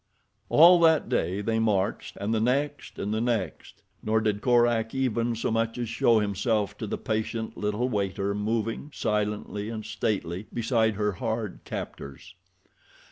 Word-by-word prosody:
All 175 +3 +8
that 160 -2 +4
day 95 +4 0
they 110 +2 0
marched, 105 -2 0
and 100 +3 -1
the 110 - +2
next 140 +5 -1
and 105 - -2
the 110 - 0
next, 115 -9 -3 0.2
nor 110 +1 +1
did 105 -2 -1
Korak 120 -2 +2
even 120 -3 0
so 115 - -2
much 115 +1 0
as 120 -2 -3
show 115 0 +3
himself 105 0 0
to - - -4
the - - -3
patient 110 +1 -3
little 105 +4 -1
waiter 100 -3 -1
moving, 110 +5 -2
silently 105 0 -2
and 110 -2 -5
stately, 105 -3 -2
beside 115 -2 +1
her 105 0 0
hard 110 0 -3
captors. 70 +7 -7
110 Hz, 150 wpm, -27 LUFS, 105-115 Hz, 0.2 s, All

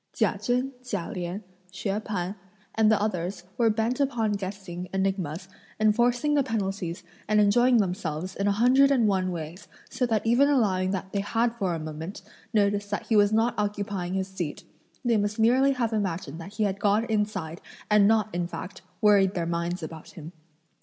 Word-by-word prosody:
Chia - - +1
Chen, 250 +2 0
Chia 205 -8 -4
Lien, 180 +1 -4 0.3
Hsúeh 195 +2 -2
P'an 190 -2 -3 0.4
and 220 -1 +4
the 220 - +3
others 185 -3 -2
were 230 -2 +3
bent 225 +4 0
upon 240 -6 +1
guessing 190 -3 -5
enigmas, 190 -3 -2 0.3
enforcing 240 +6 +2
the 290 - +4
penalties 195 -8 -3 0.2
and 215 0 +3
enjoying 240 +5 +4
themselves 185 -3 -2
in 200 - -1
a - - +4
hundred 250 +6 +5
and 250 -6 +3
one 185 -2 +1
ways, 170 +2 -7 0.2
so 250 - 0
that 220 -2 0
even 245 +5 +4
allowing 195 -9 +2
that 190 0 -3
they 200 - 0
had 230 +4 0
for 195 -7 -1
a - - -4
moment 160 +5 -7 0.3
noticed 205 -2 +1
that 205 - -3
he 225 - +3
was 205 0 +5
not 225 +2 +2
occupying 205 -3 -2
his 190 0 -1
seat, 185 -5 -5 0.4
they 235 -2 +3
must 205 0 -1
merely 255 +5 +4
have 235 -3 -1
imagined 170 -6 -2
that 195 +5 -9
he 215 0 -1
had 200 -1 -1
gone 210 +2 +2
inside 205 -7 -2 0.3
and 210 -1 +5
not, 215 -1 +2
in 175 0 -1
fact, 185 +2 -8 0.2
worried 200 -2 +4
their 170 -2 -1
minds 170 +1 -2
about 160 0 -9
him. 160 -1 -9
205 Hz, 180 wpm, -26 LUFS, 185-225 Hz, 0.4 s, hundred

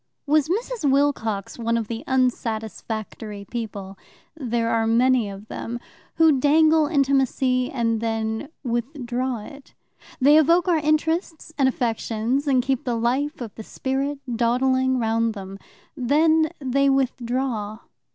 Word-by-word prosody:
Was 300 0 +2
Mrs. 440 - -1
Wilcox 255 -8 0
one 230 0 0
of 225 -2 -3
the 230 0 -5
unsatisfactory 220 -4 -2
people 200 -4 -6 0.4
there 235 -6 -1
are 225 -1 +1
many 240 -1 +3
of 200 +2 -10
them 235 +2 -5 0.4
who 320 -4 +4
dangle 310 +2 +4
intimacy 265 -3 +1
and 230 -3 -1
then 225 +3 -2
withdraw 245 -1 -2
it? 280 0 -14 0.4
They 290 +3 +6
evoke 335 +4 +3
our 345 -2 +3
interests 315 +1 -1
and 270 -2 +3
affections, 240 +2 -1
and 260 -3 +3
keep 265 -1 -1
the 240 -2 -1
life 260 +5 -1
of 225 -4 -6
the 220 - -9
spirit 275 +5 -2 0.2
dawdling 260 +2 +2
round 230 -1 0
them. 195 0 -8 0.4
Then 315 +4 +3
they 275 0 +1
withdraw. 245 -4 -1
255 Hz, 130 wpm, -23 LUFS, 230-285 Hz, 0.4 s, They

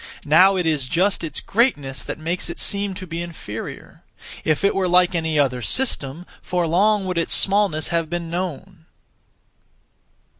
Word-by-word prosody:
Now 185 +6 +5
it 180 -2 -1
is 150 -5 0
just 185 +6 +1
its 160 - -4
greatness 145 - 0
that - - -6
makes 170 +3 -3
it 170 - -6
seem 200 -1 0
to 185 - -7
be 165 -1 -5
inferior. 160 -11 -8 0.4
If 155 +2 0
it 200 - +3
were 190 -1 0
like 180 0 +4
any 160 -2 -1
other 130 -4 +1
(system), 165 - -1 0.2
for 180 -1 -1
long 200 +5 +2
would 180 -2 -1
its 165 - +1
smallness 195 -6 +3
have 165 -2 -1
been 175 -1 -3
known! 180 0 -6
170 Hz, 160 wpm, -21 LUFS, 155-190 Hz, 0.4 s, Now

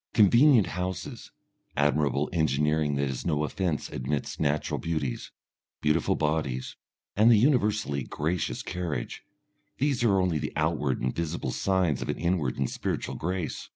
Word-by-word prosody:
Convenient 115 +2 +6
houses, 90 +1 -5 0.5
admirable 70 0 +2
engineering 75 -1 +1
that 70 0 0
is 65 -2 -4
no 75 -3 0
offence 85 0 -2
amidst 70 +3 -3
natural 75 0 0
beauties, 75 -7 -3 0.5
beautiful 75 +2 +1
bodies, 75 -4 -1 0.4
and 110 +4 +6
a - - +7
universally 105 - +2
gracious 80 +7 -2
carriage, 85 -9 -4 0.6
these 135 -3 +1
are 100 -5 +4
only 90 -4 +1
the - - -4
outward 75 -4 0
and 65 0 -1
visible 85 -5 -2
signs 90 -6 +1
of - - -4
an - - -1
inward 85 -7 0
and 65 -2 -1
spiritual - - -3
grace. 90 0 -4
80 Hz, 140 wpm, -27 LUFS, 70-95 Hz, 0.6 s, a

